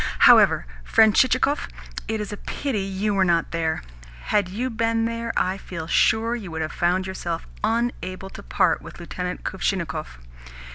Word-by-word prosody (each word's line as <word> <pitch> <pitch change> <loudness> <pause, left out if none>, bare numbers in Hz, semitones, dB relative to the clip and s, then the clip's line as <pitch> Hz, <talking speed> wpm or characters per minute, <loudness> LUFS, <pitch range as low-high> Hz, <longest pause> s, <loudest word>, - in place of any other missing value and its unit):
However, - - +7 0.2
friend 220 - +5
Chichikov, 265 +3 +3 0.4
it 220 0 -1
is 210 0 -4
a - - -6
pity 270 -1 -3
you 195 +2 -1
were 195 -1 +3
not 170 -2 +1
there. 160 -1 -1 0.5
Had 205 -3 +3
you 245 +7 -3
been 225 0 +1
there, 230 0 -2
I 185 +1 +1
feel 170 -4 -6
sure 220 +7 +2
you 210 -7 -6
would 160 -1 -3
have 155 - -4
found 180 +2 +1
yourself 175 -3 -4 0.2
unable 215 -4 -2
to - - -9
part - - +1
with - - -11
Lieutenant 180 +1 -5
Kuvshinnikov. 170 - -2
195 Hz, 160 wpm, -24 LUFS, 175-225 Hz, 0.5 s, However